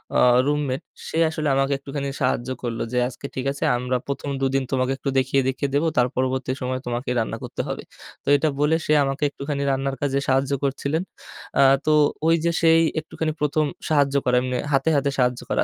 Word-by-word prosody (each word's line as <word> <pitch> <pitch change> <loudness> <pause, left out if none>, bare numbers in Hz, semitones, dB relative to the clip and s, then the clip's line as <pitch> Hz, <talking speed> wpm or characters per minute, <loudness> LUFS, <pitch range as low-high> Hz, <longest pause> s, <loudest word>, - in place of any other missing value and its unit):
আ - - +4 0.3
roommate, 145 -1 0 0.3
সে 160 - -4
আসলে 155 -1 -3
আমাকে 135 +1 +2
একটুখানি 140 0 -5
সাহায্য 130 -1 0
করলো 115 -2 -3
যে, - - 0
"আজকে 130 - -9
ঠিক 130 0 -3
আছে, 140 - -5
আমরা 125 +1 -2
১ম 140 +1 -4
দু 135 - +2
দিন 135 - +2
তোমাকে 130 -1 +1
একটু 135 - -3
দেখিয়ে, 135 +1 +2
দেখিয়ে 135 +2 -1
দেব, 145 - +2
তার 125 0 +4
পরবর্তী 130 0 -1
সময়ে 130 0 -2
তোমাকেই 120 +1 -2
রান্না 110 - -2
করতে - - -4
হবে।" - - -4 0.4
তো - - -31
এটা 145 +2 +2
বলে 150 +2 +3
সে - - -1
আমাকে 135 +1 -2
একটুখানি 140 0 -4
রান্নার 135 0 -1
কাজে 140 -1 +1
সাহায্য 135 +1 +2
করছিলেন। 140 +4 -1 0.6
আ - - +7 0.2
তো 155 - +3 0.4
ওই 165 - +5
যে 170 - +3
সেই 165 0 +5 0.2
একটুখানি 155 0 -3
১ম 150 +1 +2 0.2
সাহায্য 140 -2 +2
করে 125 - +3
এম্নে 125 0 -2 0.2
হাতে, 135 +3 +3
হাতে 140 0 +2
সাহায্য 125 -1 +2
করা। - - +2
135 Hz, 200 wpm, -23 LUFS, 130-145 Hz, 0.6 s, আ